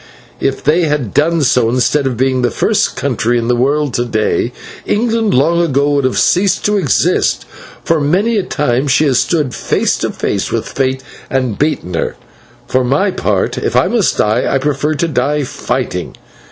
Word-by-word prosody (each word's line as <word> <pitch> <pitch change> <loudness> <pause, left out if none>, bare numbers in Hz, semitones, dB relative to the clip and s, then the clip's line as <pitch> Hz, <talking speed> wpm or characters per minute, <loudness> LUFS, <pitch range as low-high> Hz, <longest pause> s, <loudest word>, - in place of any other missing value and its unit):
If 135 - -2
they 165 +4 +2
had 145 -8 -2
done 165 +1 +2
so, 125 -3 +2
instead 130 +3 +1
of 125 -3 -3
being 130 0 +1
the 120 - +2
first - - 0
country 120 +2 0
in 115 -1 -1
the 125 - +3
world 140 +2 0
to 120 - 0
day, 115 0 -1 0.4
England 225 -1 +1
long 165 +6 +3
ago 145 -3 +1
would 140 -2 +1
have 130 - 0
ceased 190 +2 +2
to 210 - +2
exist, 150 -9 +1 0.4
for 165 -2 +1
many 190 +11 +1
a - - +2
time 140 -6 -1
she 140 +3 +3
has 130 -4 +2
stood 150 -7 0
face - - 0
to - - -1
face - - -2
with - - -1
Fate 130 -1 -2 0.3
and 130 -5 -1
beaten 145 - -1
her. 85 - -2 0.5
For 130 0 0
my 140 +11 +1
part, - - -1
if - - -2
I - - +4
must - - +1
die, 110 +3 +1
I 135 - +2
prefer 145 +2 -1
to 170 +4 0
die 145 0 0
fighting. 125 - -3
140 Hz, 185 wpm, -14 LUFS, 125-155 Hz, 0.5 s, I